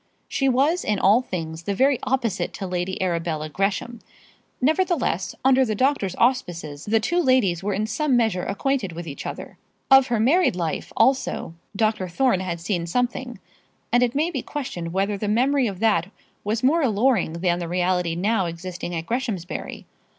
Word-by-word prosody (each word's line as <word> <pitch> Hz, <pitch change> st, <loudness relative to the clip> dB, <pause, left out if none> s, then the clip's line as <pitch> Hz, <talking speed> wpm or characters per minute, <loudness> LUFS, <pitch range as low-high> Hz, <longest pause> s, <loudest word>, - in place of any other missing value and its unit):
She 270 Hz, -1 st, +1 dB
was 285 Hz, +8 st, +2 dB
in 210 Hz, -1 st, 0 dB
all 205 Hz, +6 st, +4 dB
things 165 Hz, -7 st, -5 dB
the 200 Hz, +4 st, -3 dB
very 265 Hz, +3 st, +3 dB
opposite 245 Hz, -5 st, -1 dB
to 195 Hz, -, -5 dB
Lady 180 Hz, 0 st, -3 dB
Arabella 165 Hz, -4 st, -2 dB
Gresham; 200 Hz, +7 st, -2 dB, 0.6 s
nevertheless, 305 Hz, -, 0 dB
under 265 Hz, 0 st, +5 dB
the 220 Hz, -4 st, -1 dB
doctor's 255 Hz, -6 st, +1 dB
auspices, 175 Hz, -, -1 dB
the 220 Hz, +2 st, +2 dB
two 345 Hz, +11 st, +1 dB
ladies 250 Hz, -, +2 dB
were 200 Hz, 0 st, -1 dB
in 210 Hz, +2 st, 0 dB
some 255 Hz, +4 st, +1 dB
measure 220 Hz, -6 st, +1 dB
acquainted 205 Hz, -2 st, -1 dB
with 170 Hz, +1 st, -7 dB
each 140 Hz, -, -6 dB
other. -, -, -8 dB, 0.3 s
Of 270 Hz, -1 st, +8 dB
her 235 Hz, -3 st, 0 dB
married 280 Hz, -, +3 dB
life, 170 Hz, -3 st, -3 dB
also, 265 Hz, -10 st, +1 dB, 0.2 s
Dr. 215 Hz, -3 st, 0 dB
Thorne 195 Hz, +3 st, +1 dB
had 175 Hz, -2 st, -3 dB
seen 170 Hz, 0 st, -2 dB
something, 245 Hz, +4 st, -2 dB, 0.5 s
and 245 Hz, -, +4 dB
it 245 Hz, 0 st, +1 dB
may 315 Hz, +5 st, +1 dB
be 270 Hz, -6 st, -3 dB
questioned 180 Hz, -, -5 dB
whether 195 Hz, +2 st, -1 dB
the 210 Hz, -, -2 dB
memory 255 Hz, +4 st, +2 dB
of 195 Hz, -3 st, -5 dB
that 195 Hz, -5 st, +2 dB, 0.3 s
was 220 Hz, +3 st, -2 dB
more 315 Hz, +6 st, +4 dB
alluring 235 Hz, -, +2 dB
than 175 Hz, +1 st, 0 dB
the 170 Hz, -, -4 dB
reality 180 Hz, -1 st, 0 dB
now 195 Hz, +1 st, +1 dB
existing 175 Hz, +1 st, -6 dB
at 165 Hz, 0 st, -4 dB
Greshamsbury. 225 Hz, -7 st, -4 dB
210 Hz, 170 wpm, -23 LUFS, 180-255 Hz, 0.6 s, Of